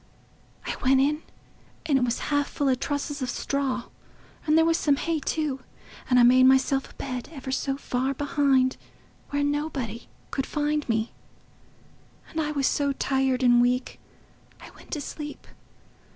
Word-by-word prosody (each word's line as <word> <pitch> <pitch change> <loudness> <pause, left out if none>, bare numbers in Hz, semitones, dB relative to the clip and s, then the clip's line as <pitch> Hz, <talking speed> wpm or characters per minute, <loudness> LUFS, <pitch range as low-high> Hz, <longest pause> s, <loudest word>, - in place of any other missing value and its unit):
I - - -2
went 265 0 +4
in, 295 +3 +2 0.6
and 300 -3 +2
it - - +1
was 240 -1 0 0.2
half 285 0 +2
full 285 - -1
o' - - +4
trusses 285 +2 -3
of 255 - -2
straw, 265 -1 -1 0.6
and 305 +1 +4
there 325 - +5
was 330 0 +3
some 290 -2 +3
hay 325 +2 -1
too. 295 -3 -2 0.5
And 250 - +4
I - - +7
made 255 +2 +7
myself 265 +1 +3
a - - -18
bed, 255 -2 -5
ever 270 -4 -6
so 270 +1 -1
far 265 0 -1
behind, 275 -2 +2 0.5
where 285 0 0
nobody 285 -6 -2 0.2
could 270 - -2
find 295 -1 -1
me; 225 0 0 1.2
and 320 - -1
I 300 - -1
was 280 -2 0
so 280 0 +1
tired 265 -1 0
and 240 -1 +6
weak, 250 +1 0 0.6
I - - -12
went - - -17
to 300 - -2
sleep.... 295 +1 -7
275 Hz, 165 wpm, -26 LUFS, 255-290 Hz, 1.2 s, I